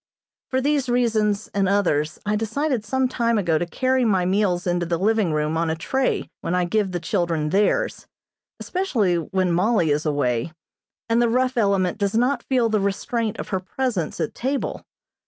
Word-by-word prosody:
For 260 0 0
these 280 -2 +1
reasons 220 -4 +1
and 195 -2 0
others 155 -7 +1
I 210 +1 +1
decided 230 +3 -1
some 260 +4 0
time 235 -2 0
ago 170 -6 +1
to 175 - -2
carry 260 +6 +1
my 190 -6 +2
meals 185 -2 +1
into 175 -1 0
the 170 0 0
living 210 -1 +1
room 155 +1 0
on 165 0 0
a 160 - 0
tray 260 +11 -1
when 175 - -2
I 180 -1 +1
give 200 +1 0
the 175 - -2
children 165 -3 -1
theirs; 210 - +1 0.5
especially 235 - 0
when 185 +2 -1
Mollie 180 -2 +2
is 150 +1 +1
away, 145 -2 -1 0.5
and 230 +1 +2
the 240 - +3
rough 255 +2 +1
element 200 -4 +1
does 200 0 0
not 250 +2 +2
feel 250 -3 +1
the 215 -1 +1
restraint 210 +3 -1
of - - -6
her 190 - 0
presence 190 - -3
at 160 - -2
table. 270 +3 -3
205 Hz, 180 wpm, -23 LUFS, 175-240 Hz, 0.5 s, the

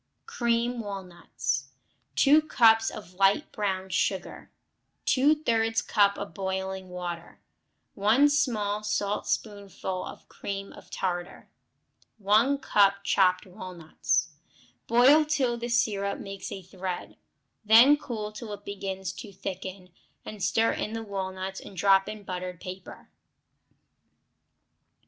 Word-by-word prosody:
Cream 240 - 0
Walnuts 180 - -4 0.5
2 295 +3 +6
cups 225 -6 +4
of 205 -4 -10
light 195 +9 +2
brown 190 -3 -2
sugar. - - -2 0.6
Two 275 +4 +4
thirds 225 -6 +1
cup 200 -2 +3
of 200 0 -6
boiling 190 -1 -4
water. 175 -1 -6 0.5
1 220 +8 +4
small 220 -8 0
saltspoonful 205 -2 -2
of - - -10
cream 195 0 -6
of - - -15
tartar. 175 -1 -4 0.7
1 220 +7 +3
cup 200 -6 +3
chopped 185 -2 +3
walnuts. 180 -5 -2 0.6
Boil 255 +7 +6
till 280 -5 0
the 235 0 -5
syrup 205 -4 +1
makes 195 0 -7
a 190 - -6
thread, 185 0 -6 0.5
then 230 +7 +8
cool 225 -7 -5
till 215 +1 -8
it 205 0 -10
begins 190 -1 -4
to 215 -5 -9
thicken, 190 -1 -7 0.3
and 210 -2 -8
stir 225 +4 +2
in 215 - -3
the 225 0 -4
walnuts 190 -2 -4
and 190 - -12
drop 195 0 +4
on 215 -1 -7
buttered 180 -2 -5
paper. 185 0 -10
200 Hz, 115 wpm, -27 LUFS, 190-225 Hz, 0.7 s, then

